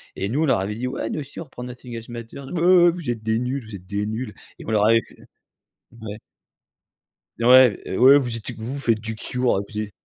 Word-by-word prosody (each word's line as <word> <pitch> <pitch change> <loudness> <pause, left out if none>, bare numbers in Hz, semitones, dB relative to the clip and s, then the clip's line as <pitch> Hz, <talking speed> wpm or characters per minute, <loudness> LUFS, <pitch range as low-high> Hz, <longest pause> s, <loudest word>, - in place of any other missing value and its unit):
et 100 - -3
nous, 145 +7 0
on - - +3
leur 130 - +2
avait 100 +2 -3
dit: 125 +3 -3
«Ouais, 120 -3 -3
nous - - -3
aussi 140 - -10
on 165 - -6
reprend 125 -2 -10
Nothing 125 -1 -9
Else 115 +1 -8
Matters», 120 +3 -8
«Heu, 175 0 +6
vous 170 -7 -6
êtes 115 -2 -3
des 110 +1 +1
nuls, 130 +1 -3
vous 110 - -8
êtes 95 -1 -11
des 100 +1 -2
nuls» 110 +1 -4 0.3
et - - -10
on 110 - -4
leur 105 -1 +3
fait 115 0 +5 1.0
ouais. 105 -1 -6 1.2
Ouais, 125 -1 +6
heu: - - -4
«Ouais 135 +3 +8
vous 120 -4 -2
êtes 115 +2 -6
vous 115 +4 -5
vous 140 - -5
faites 115 -5 +1
du 110 0 -5
Cure, 125 +3 0
heu, - - 0
vous 105 - -5
ê» 105 -1 -4
120 Hz, 245 wpm, -23 LUFS, 110-130 Hz, 1.2 s, Ouais